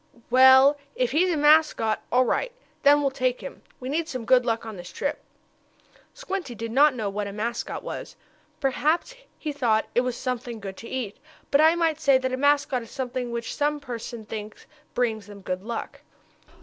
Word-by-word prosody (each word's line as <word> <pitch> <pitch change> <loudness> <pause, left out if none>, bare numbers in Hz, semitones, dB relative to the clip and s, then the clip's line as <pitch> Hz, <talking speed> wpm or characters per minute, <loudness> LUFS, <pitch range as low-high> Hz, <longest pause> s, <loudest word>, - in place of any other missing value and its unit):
"Well, 265 +3 +7 0.2
if 250 -2 0
he's 355 +6 +3
a 325 - 0
mascot, 295 -7 +4
all 255 +1 +4
right. - - 0 0.3
Then 290 +1 +6
we'll 275 -1 +1
take 255 -1 -1
him. 275 - -9 0.2
We 255 - -7
need 315 +4 -1
some 255 -3 -5
good 250 0 +4
luck 230 -1 0
on 220 -2 -7
this 175 -1 -9
trip." 285 - -3 1.0
Squinty 385 - -5
did 230 +1 -5
not 280 +2 +5
know 220 -4 -2
what 200 +1 -3
a - - -5
mascot 230 +4 -4
was. - - -7 0.4
Perhaps 305 - 0 0.2
he 305 - -4
thought 230 -6 +1
it 245 - +3
was 250 -1 -3
something 245 -2 -4
good 195 -2 -7
to 230 - -9
eat. 240 -6 -4 0.3
But 285 - +5
I 320 +2 +6
might 325 -3 +1
say 275 -1 +5
that 260 0 -2
a - - 0
mascot 285 -2 +2
is 230 - -11
something 255 -2 -4
which 235 -1 -4
some 295 0 0
persons 235 -4 -7
think 215 -1 -7 0.3
brings 220 -4 -1
them 205 -1 -11
good 185 -1 -3
luck. 230 +3 -6
255 Hz, 190 wpm, -25 LUFS, 230-285 Hz, 1.0 s, Well